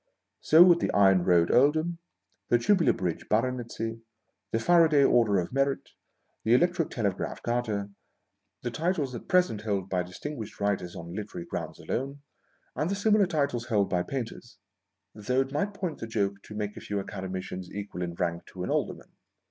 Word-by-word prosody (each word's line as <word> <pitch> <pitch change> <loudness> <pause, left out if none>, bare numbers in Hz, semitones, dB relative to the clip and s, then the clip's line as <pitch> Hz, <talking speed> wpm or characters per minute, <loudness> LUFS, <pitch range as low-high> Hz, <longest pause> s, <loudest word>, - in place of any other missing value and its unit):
So 160 +3 +7
would 175 -1 +6
the - - 0
Iron 95 -3 +5
Road 85 -2 +4
Earldom, 155 +6 +3 0.5
the 120 - +5
Tubular 175 - +3
Bridge 90 -3 -3
Baronetcy, 115 -1 -1 0.5
the - - 0
Faraday 160 +2 +5
Order 115 -6 +4
of 90 +5 -2
Merit, 135 0 0 0.5
the 115 +3 +4
Electric 175 +3 +2
Telegraph 100 -5 -3
Garter, 110 -4 -1 0.7
the 120 - -2
titles 155 -1 -1
at 120 - -8
present 180 - +2
held 100 -3 -2
by 90 -1 +1
distinguished 110 +6 -7
writers 100 -3 -1
on 85 +1 -8
literary 100 -4 -6
grounds - - -5
alone, 140 +3 -4 0.5
and 150 - -1
the 200 - 0
similar 205 -1 +3
titles 140 -7 -1
held 105 -4 +1
by 90 -1 +2
painters; 120 +1 -6 0.3
— 100 0 -56
though 125 +5 0
it 135 0 -3
might 195 +8 -1
point 180 -6 -4
the 115 - -5
joke 100 -3 -1
to 105 - -10
make 105 0 -3
a - - -9
few 100 -1 -3
Academicians 95 -2 -5
equal 100 -3 -6
in 85 -1 -3
rank 85 -2 -2
to 90 - -7
an - - -2
aiderrnan. - - -2
115 Hz, 170 wpm, -28 LUFS, 100-145 Hz, 0.7 s, So